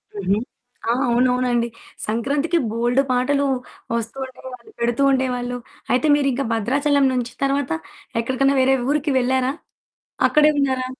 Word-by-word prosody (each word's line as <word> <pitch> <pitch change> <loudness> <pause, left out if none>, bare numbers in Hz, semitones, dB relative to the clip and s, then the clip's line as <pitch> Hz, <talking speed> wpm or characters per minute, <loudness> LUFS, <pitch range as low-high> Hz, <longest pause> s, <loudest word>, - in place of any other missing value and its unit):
హుహు. 200 0 0 0.5
ఆ! - - +4 0.2
అవునవునండి. 245 0 +2 0.4
సంక్రాంతికి 280 +9 0
బోల్డు 240 +3 +2
పాటలు 280 +3 +2 0.5
వస్తూ 230 +3 -3
ఉండేవాళ్ళు, 260 +10 -12
పెడుతూ 235 +3 0
ఉండేవాళ్ళు. 250 -2 -1 0.4
అయితే 280 +5 +2
మీరింకా 275 -2 0
భద్రాచలం 280 +5 +2
నుంచి 245 -1 -2
తర్వాత 275 - 0 0.5
ఎక్కడికన్నా 270 +3 +1
వేరే 265 +1 +4
ఊరికి 290 -1 +1
వెళ్లారా? 260 +1 +1 0.8
అక్కడే 300 0 +5
ఉన్నారా? 260 -2 +1
255 Hz, 115 wpm, -21 LUFS, 245-275 Hz, 0.8 s, అక్కడే